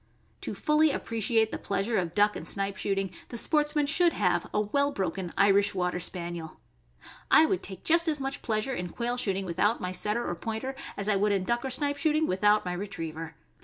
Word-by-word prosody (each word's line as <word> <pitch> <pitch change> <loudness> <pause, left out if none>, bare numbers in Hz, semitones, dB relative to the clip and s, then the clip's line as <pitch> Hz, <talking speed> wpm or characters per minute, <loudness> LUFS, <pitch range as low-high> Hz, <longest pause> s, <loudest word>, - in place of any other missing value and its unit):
To - - -4
fully 305 +1 +3
appreciate 225 -3 0
the - - -4
pleasure 200 +3 0
of 175 -2 -3
duck 210 0 +4
and - - -7
snipe 195 0 -2
shoot 195 +1 -1
ing, 195 -2 -1 0.2
the 240 - -6
sportsman 295 +2 +2
should 335 +4 +3
have 175 -3 0
a - - +1
well 280 +7 +1
broken 190 -5 -3
Irish 200 0 +4
Water 180 -1 -1
Spaniel. 170 -2 -4 0.7
I 320 - +7
would 370 +3 0
take 190 - -5
just 335 +1 +3
as 305 -2 +1
much 270 +1 -4
pleasure 225 +4 -1
in 180 -7 -4
quail 240 +5 -2
shooting 195 -5 -1
without 190 +6 +1
my 180 - -3
Setter 210 +6 -1
or - - -1
Pointer 225 +8 -4 0.2
as 200 - -2
I 205 -2 +3
would 205 +1 +2
in 195 -2 +1
duck 235 +4 -1
or 265 - -2
snipe 285 +2 0
shooting 310 +1 +2
without 210 -1 +3
my 180 - -2
Retriever. 165 -4 -5
210 Hz, 205 wpm, -28 LUFS, 185-270 Hz, 0.7 s, I